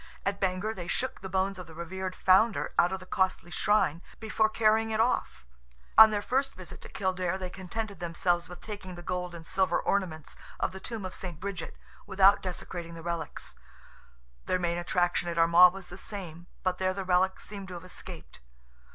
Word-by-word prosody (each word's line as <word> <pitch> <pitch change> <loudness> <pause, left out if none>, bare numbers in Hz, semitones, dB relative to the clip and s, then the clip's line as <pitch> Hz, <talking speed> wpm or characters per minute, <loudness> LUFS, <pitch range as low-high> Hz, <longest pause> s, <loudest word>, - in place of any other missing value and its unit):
At 200 0 -1
Bangor 190 +3 0
they 175 -5 -7
shook 260 +8 -2
the 190 - -6
bones 190 +1 0
of 180 - -8
the 160 - -12
revered 185 +2 -4
founder 190 +3 +3
out 175 - +5
of 190 - -2
the 185 - -11
costly 185 -2 0
shrine 190 -4 +2 0.2
before 220 0 +1
carrying 220 0 +3
it 220 0 -1
off; 70 - 0 0.5
on 220 0 +11
their 205 -1 -1
first 270 +4 0
visit 185 -1 -10
to - - -9
Kildare 185 -2 -1
they 185 -1 -5
contented 200 +3 -5
themselves 175 0 0
with 175 0 -10
taking 200 -4 -7
the 175 - -10
gold 180 -1 -3
and 165 -1 -9
silver 185 -1 +1
ornaments 170 -6 -2 0.2
of - - 0
the 190 - -8
tomb 220 0 -5
of 185 - -5
St. 175 -5 -7
Bridget, 200 -1 -5 0.3
without 195 +1 +5
desecrating 175 -2 -6
the 165 - -9
relics; 170 -1 -5 0.9
their 185 - +2
main 175 -1 -1
attraction 175 0 +1
at 170 - -4
Armagh 170 +2 +8
was 195 -2 -9
the 175 - -8
same, 175 -5 -7 0.2
but 185 -1 0
there 185 0 +1
the 195 -1 -4
relics 185 +1 +2
seemed 200 -2 -7
to 180 - -7
have 175 +1 -8
escaped. 65 - -9
185 Hz, 195 wpm, -29 LUFS, 175-200 Hz, 0.9 s, on